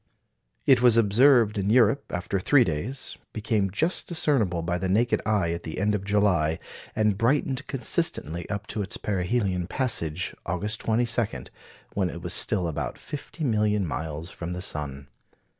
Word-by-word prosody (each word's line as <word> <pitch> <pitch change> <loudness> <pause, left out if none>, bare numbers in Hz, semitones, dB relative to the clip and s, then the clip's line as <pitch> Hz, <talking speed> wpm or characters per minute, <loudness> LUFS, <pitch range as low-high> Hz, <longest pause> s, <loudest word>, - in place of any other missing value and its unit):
It 130 -3 +5
was 120 -2 +6
observed 115 0 +4
in 100 +1 0
Europe 120 +2 +3
after 90 +2 -2
three 135 +7 +4
days, 105 - -4
became 110 -2 0
just 160 - -1
discernible 130 - +1
by 85 +1 -1
the 95 - -2
naked 115 +6 +2
eye 100 -6 +1
at 85 0 -3
the 80 - -6
end 105 +2 +1
of 100 -2 -1
July, 95 -6 +2 0.4
and 105 -2 +1
brightened 135 +3 +1
consistently 125 - 0
up 100 0 -3
to 105 - -2
its 100 - -4
perihelion 95 -2 -1
passage, 90 - -1
August 105 +6 -3
22, 115 - 0 0.5
when 95 -3 0
it 85 0 -8
was 90 - -2
still 95 -3 +3
about 80 - -4
fifty 155 +2 -7
million 105 -5 +1
miles 80 +1 -5
from 85 +1 -6
the 90 - -5
sun. 70 -4 -4
105 Hz, 160 wpm, -26 LUFS, 90-120 Hz, 0.5 s, was